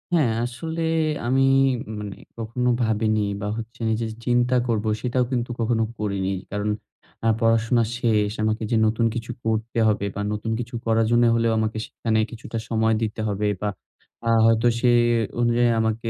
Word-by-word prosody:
হ্যাঁ, 145 -9 +3
আসলে 160 +7 -5 0.5
আমি 130 +2 +3 0.6
মানে 105 -2 -6 0.2
কখনো 115 +2 -1
ভাবিনি, 110 -1 +1 0.2
বা 105 - -2
হচ্ছে 115 +1 -8 0.2
যে - - 0 0.2
চিন্তা 125 0 +2
করবো 110 -2 0
সেটাও 125 +1 +1
কিন্তু 120 -1 -1
কখনো 115 0 +1
করিনি। 100 -2 -1 0.2
কারণ 105 +1 -1 0.5
অ্যাঁ 115 -1 +2
পড়াশোনা 115 +1 +3
শেষ। 110 -4 +1
আমাকে 110 +1 0
যে 115 - +3
নতুন 110 +2 +1
কিছু 120 +1 -4
করতে 110 +1 -1
হবে, 105 -1 +1
বা 105 - -2
নতুন 110 +1 -3
কিছু 120 +1 -6
করার 115 0 +3
জন্য 120 0 +4
হলেও 115 0 +2
আমাকে 110 0 -1
সেখানে 110 -1 -1
কিছুটা 115 0 -6
সময় 110 -1 +2
দিতে 110 0 -2
হবে 105 0 -1
বা 105 - 0 0.6
আ - - +3 0.2
হয়তো 115 +1 +4
সে 125 0 +4 0.5
অনুযায়ী 120 0 +3
আমাকে 110 +1 -1
115 Hz, 160 wpm, -23 LUFS, 110-120 Hz, 0.6 s, জন্য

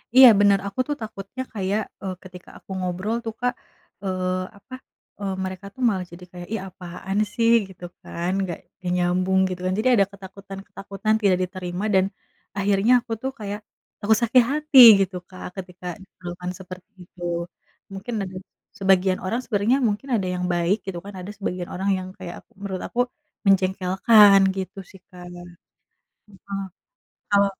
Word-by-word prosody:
Iya, 260 0 +11
benar, 200 -1 +5
aku 200 - -7
tuh 295 - -1
takutnya 220 +3 -6
kayak, 200 +1 0 0.2
eee, 190 - -2
ketika 180 -1 -12
aku - - -22
ngobrol 185 +4 -2
tuh, 225 - -3
Kak, 245 0 +1 0.5
eee, 185 -1 -1 0.2
apa, 255 +6 -16 0.5
eee, 195 -1 -2
mereka 185 +1 -5
tuh 260 - -10
malah 190 -3 -1
jadi 175 +1 -11
kayak, 175 -1 -9
"Ih, 220 - -2
apaan 185 +2 -6 0.2
sih?" 230 0 +3 0.2
Gitu 180 -2 -11 0.2
kan, 175 +2 -3 0.2
"Gak 175 - -5 0.2
gak 180 - -2
nyambung," 180 +1 +2
gitu 180 -1 -5
kan. 185 - +1
Jadi 245 +4 +3
ada 200 - +5
ketakutan-ketakutan 195 +1 -5
tidak 195 -3 +4
diterima 180 +1 -4
dan 190 - +5 0.5
akhirnya 200 +3 +2
aku 240 -1 -13
tuh 265 - -1
kayak 205 0 -4 0.4
takut 215 +1 +4
sakit 240 +2 +5
hati 300 -2 +4 0.2
gitu, 190 -1 -1
Kak, 185 - -9
ketika 180 -2 -9 0.2
diperlakukan 180 -1 -7
seperti 185 0 -11 0.2
itu, 180 - -19 0.7
mungkin 200 +5 -6
ada 185 0 -9 0.4
sebagian 190 -1 +3
orang 225 +6 -1
sebenernya 220 +4 +2
mungkin 215 +6 -3
ada 195 -4 0
yang 180 - -3
baik 175 +4 +2
gitu 190 -2 -4
kan, 200 - -8
ada 185 +3 -7
sebagian 180 -3 -4
orang 190 +2 -1
yang 185 0 -5
kayak 180 -3 -7 0.2
menurut 190 -2 -4
aku 240 - -5 0.5
menjengkelkan, 195 +2 +6 0.2
gitu 190 +1 -5
sih, 190 - -14
Kak. 180 -2 -12 1.1
Heeh, 195 0 -6 0.7
kalo 200 0 +5
195 Hz, 160 wpm, -24 LUFS, 185-205 Hz, 1.1 s, Iya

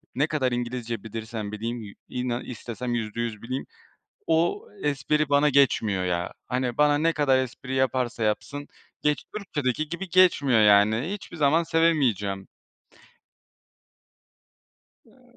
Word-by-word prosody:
Ne 145 +5 +2
kadar 135 -5 0
İngilizce 120 -2 -3
bilirsem 110 -1 -5
bileyim 115 +2 -4
yü 100 -2 -9 0.2
inan 125 -1 -2
istesem 120 0 -4
%100 115 -1 -3
bileyim. 130 +3 -4 0.6
O 165 +5 +1 0.2
espri 150 +1 +1
bana 145 +1 +4
geçmiyor 115 -9 +3
ya. 85 -1 -1
Hani 125 -1 -1
bana 150 0 +4
ne 165 +2 +2
kadar 140 -4 +3
espri 130 0 -4
yaparsa 130 -3 0
yapsın, 140 +7 -2 0.3
geç 150 -1 +1
Türkiye'deki 155 - -2
gibi 180 +3 -5
geçmiyor 155 -10 +4
yani. 105 - +4
Hiçbir 205 -4 -8
zaman 155 +2 +3
sevemeyeceğim. 130 - +1 2.6
Eee, - - -24
125 Hz, 120 wpm, -26 LUFS, 115-150 Hz, 2.6 s, bana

